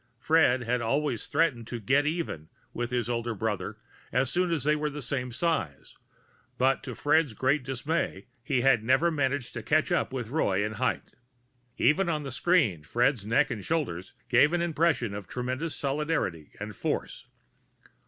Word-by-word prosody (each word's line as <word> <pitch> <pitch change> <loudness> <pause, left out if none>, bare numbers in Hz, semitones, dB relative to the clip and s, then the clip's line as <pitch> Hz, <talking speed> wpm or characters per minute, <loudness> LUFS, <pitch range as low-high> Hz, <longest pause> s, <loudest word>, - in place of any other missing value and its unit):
Fred 130 -2 +3
had 120 +1 0
always 130 0 0
threatened 140 -7 +1
to 120 - -5
"get 135 +8 +2
even" 150 - -3 0.2
with 120 0 -3
his 120 -2 -1
older 120 -1 -2
brother 105 -3 -3 0.3
as 130 +2 +1
soon 180 +2 +1
as 160 -5 0
they 150 +1 +3
were 150 0 -1
the 150 0 -7
same 125 -1 -2
size, 120 - -2 0.6
but 130 +1 +2
to 125 -4 -7
Fred's 150 -5 +2
great 130 +3 +1
dismay 135 - -2 0.2
he 130 -1 +1
had 125 -4 +4
never 135 +8 +3
managed 140 -4 -1
to 120 - -4
catch 155 - +1
up 175 - +1
with 125 -4 -4
Roy 100 -10 +1
in 105 - -3
height. 125 +4 -2 0.6
Even 175 +4 +3
on 155 -3 -1
the 135 - -5
screen, 130 - +2
Fred's 120 - +1
neck 130 +5 +3
and 105 -5 -4
shoulders 100 - -2
gave 125 +6 +4
an 175 - +1
impression 160 -9 +1
of 100 -2 -6
tremendous 130 +6 -3
solidity 140 - -1
and 105 0 -6
force. - - -3
130 Hz, 170 wpm, -28 LUFS, 115-150 Hz, 0.6 s, had